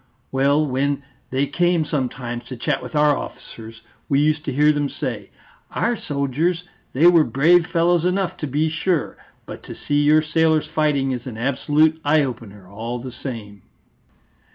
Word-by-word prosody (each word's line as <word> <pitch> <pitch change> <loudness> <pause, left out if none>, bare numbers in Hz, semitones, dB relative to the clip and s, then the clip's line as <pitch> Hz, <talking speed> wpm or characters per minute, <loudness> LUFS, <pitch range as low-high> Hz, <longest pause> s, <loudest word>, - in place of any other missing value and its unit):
Well, 140 +3 +2
when 140 +1 -1 0.3
they 135 +2 0
came 175 +2 +1
sometimes 125 -4 -3
to 130 - -8
chat 115 - -1
with - - -8
our 150 -1 +4
officers, 115 -3 -9 0.3
we 140 - +3
used 150 +1 +1
to - - -2
hear 150 +3 +4
them 145 -1 -1
say, 115 -8 -5 0.4
'Our 240 +1 0
soldiers 150 - -1 0.3
they 145 +6 +2
were 175 -2 +7
brave 160 +7 +3
fellows 170 0 +2
enough, 180 0 0
to 150 - -4
be 150 +4 0
sure! 160 +2 -1 0.3
But - - -9
to - - -8
see 145 0 0
your 155 +1 +4
sailors 160 -1 +2
fighting 150 -3 0
is 125 -1 -5
an 115 -3 -7
absolute 150 +5 +1
eye 150 +1 +3
opener 105 -7 -7
all 115 +5 -5
the 125 +1 -7
same.'" 110 -6 -8
145 Hz, 165 wpm, -21 LUFS, 130-155 Hz, 0.4 s, were